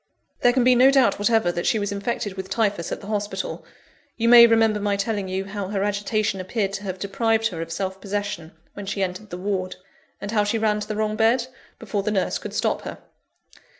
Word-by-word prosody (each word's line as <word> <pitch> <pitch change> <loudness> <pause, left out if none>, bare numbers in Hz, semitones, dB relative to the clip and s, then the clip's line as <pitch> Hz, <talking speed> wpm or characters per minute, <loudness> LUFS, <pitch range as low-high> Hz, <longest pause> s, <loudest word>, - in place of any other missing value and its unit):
"There 245 - +4
can 255 0 +2
be 255 +1 +6
no 250 +2 +6
doubt 270 -6 +3
whatever, 220 -3 +2
that 175 0 -3
she - - +3
was 205 -1 -2
infected 200 0 -3
with 190 0 -7
Typhus 200 -5 -1
at - - -4
the - - -10
hospital. 210 - -3 0.5
You 230 0 +2
may 235 -1 +10
remember 225 -2 +3
my 205 0 0
telling 200 -1 -2
you, 190 +1 -3
how 195 -1 -5
her 200 0 -1
agitation 205 0 -1
appeared 195 +1 -2
to 200 +1 -5
have 190 -1 -4
deprived 225 +4 0
her 165 -5 -6
of 165 0 -6
self 190 +3 -4
possession, 200 -5 -4 0.2
when 205 -1 -8
she 195 0 -1
entered 185 +3 -5
the 175 - -6
ward; 185 -1 -2 0.4
and 205 - -5
how 210 -2 +2
she 205 +2 0
ran 215 -1 +1
to 210 - -5
the 215 - -3
wrong 215 0 -1
bed, 230 +3 +3 0.3
before 205 - -3
the 205 - -2
nurse 195 -3 0
could - - -7
stop - - 0
her. - - -7
205 Hz, 220 wpm, -23 LUFS, 195-225 Hz, 0.5 s, may